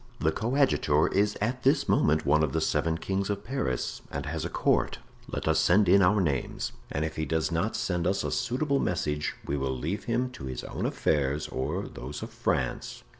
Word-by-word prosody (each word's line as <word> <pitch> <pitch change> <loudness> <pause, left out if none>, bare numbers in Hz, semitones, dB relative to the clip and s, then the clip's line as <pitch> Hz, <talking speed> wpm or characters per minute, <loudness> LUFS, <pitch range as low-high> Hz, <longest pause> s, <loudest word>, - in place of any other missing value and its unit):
The 80 - +2
coadjutor 115 - +2
is 105 +1 +1
at 125 +4 -1
this 135 +4 +3
moment 75 +1 +3
one 75 +2 +4
of 70 -4 0
the - - +2
seven 80 0 +1
kings 95 +3 -2
of 100 -1 -2
Paris, 70 - -2
and - - -4
has - - -3
a - - -2
court. - - +1 0.3
Let - - -4
us - - +3
send 95 +3 +4
in 100 +3 +6
our 100 +3 +4
names, 75 -8 -1 0.2
and 75 +2 -1
if 80 0 -5
he 80 - -1
does 80 +1 0
not 85 +7 0
send 90 -2 0
us 95 +1 +1
a - - -2
suitable 140 +3 0
message 75 -4 -1
we 70 - -1
will 65 -1 -1
leave 90 - -3
him 125 +2 0
to 65 - -8
his 65 -1 -5
own - - -3
affairs 75 0 0
or 65 - -2
those 70 +3 -7
of - - -7
France. - - -2
85 Hz, 205 wpm, -28 LUFS, 75-105 Hz, 0.3 s, in